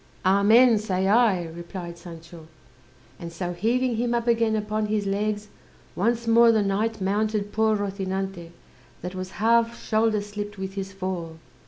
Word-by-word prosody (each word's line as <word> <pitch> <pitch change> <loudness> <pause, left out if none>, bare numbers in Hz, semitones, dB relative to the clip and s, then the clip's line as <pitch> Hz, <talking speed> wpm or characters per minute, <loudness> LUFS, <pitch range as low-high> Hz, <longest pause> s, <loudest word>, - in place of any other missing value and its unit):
"Amen, 215 +5 +5
say 190 -3 -1
I," 210 -4 +3
replied 170 +1 -8
Sancho. 165 -1 -12 0.7
And 170 0 -7
so 175 +1 -4
heaving 235 +6 0
him 240 +1 0
up 235 -1 -1
again 230 -2 +2
upon 215 0 -2
his 210 -1 -1
legs, 205 +1 -2 0.5
once 235 +4 0
more 230 0 +6
the 220 -2 +2
knight 210 +3 -1
mounted 205 +1 -1
poor 220 0 +2
Rozinante, 195 -3 -4 0.5
that 180 +1 -5
was 185 0 -6
half 230 +2 +2
shoulder 215 -1 +1
slipped 205 0 -7
with 190 0 -5
his 195 0 -5
fall. 185 -4 -5
205 Hz, 150 wpm, -25 LUFS, 185-220 Hz, 0.7 s, more